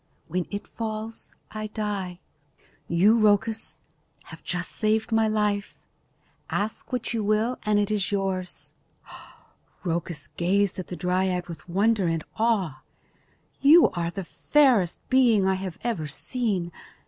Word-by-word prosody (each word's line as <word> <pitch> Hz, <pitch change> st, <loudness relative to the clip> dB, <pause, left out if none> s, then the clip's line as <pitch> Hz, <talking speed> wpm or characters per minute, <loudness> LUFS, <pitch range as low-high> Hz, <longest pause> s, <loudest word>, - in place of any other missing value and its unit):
When 180 Hz, +1 st, -2 dB
it 205 Hz, +1 st, -5 dB
falls, 220 Hz, 0 st, -6 dB, 0.2 s
I 215 Hz, 0 st, -4 dB
die. 205 Hz, -4 st, -4 dB, 0.7 s
You, 200 Hz, +7 st, +4 dB
Rhoecus, 215 Hz, +1 st, +1 dB, 0.4 s
have -, -, -12 dB
just 180 Hz, 0 st, -2 dB
saved 220 Hz, +1 st, 0 dB
my 225 Hz, 0 st, +3 dB
life. 210 Hz, -1 st, 0 dB, 0.7 s
Ask 215 Hz, +5 st, -3 dB
what 245 Hz, -2 st, -2 dB
you 225 Hz, -2 st, -1 dB
will 215 Hz, +4 st, +1 dB
and 210 Hz, -1 st, +3 dB
it 205 Hz, 0 st, +1 dB
is 210 Hz, -2 st, 0 dB
yours." 190 Hz, -2 st, -2 dB, 1.1 s
Rhoecus 165 Hz, -4 st, -3 dB
gazed 195 Hz, +2 st, +1 dB
at 185 Hz, -, -5 dB
the 180 Hz, -, -5 dB
dryad 180 Hz, 0 st, 0 dB
with 170 Hz, +1 st, -9 dB
wonder 200 Hz, +1 st, +2 dB
and 165 Hz, -1 st, -1 dB, 0.2 s
awe. 195 Hz, -, +1 dB, 0.8 s
"You 310 Hz, +5 st, +7 dB
are 170 Hz, -1 st, -2 dB
the 195 Hz, +2 st, -5 dB
fairest 240 Hz, -, +3 dB
being 240 Hz, -6 st, +4 dB
I 190 Hz, -, +3 dB
have 185 Hz, -2 st, -4 dB
ever 225 Hz, -11 st, -1 dB
seen. 195 Hz, -, -2 dB
205 Hz, 135 wpm, -26 LUFS, 180-220 Hz, 1.1 s, You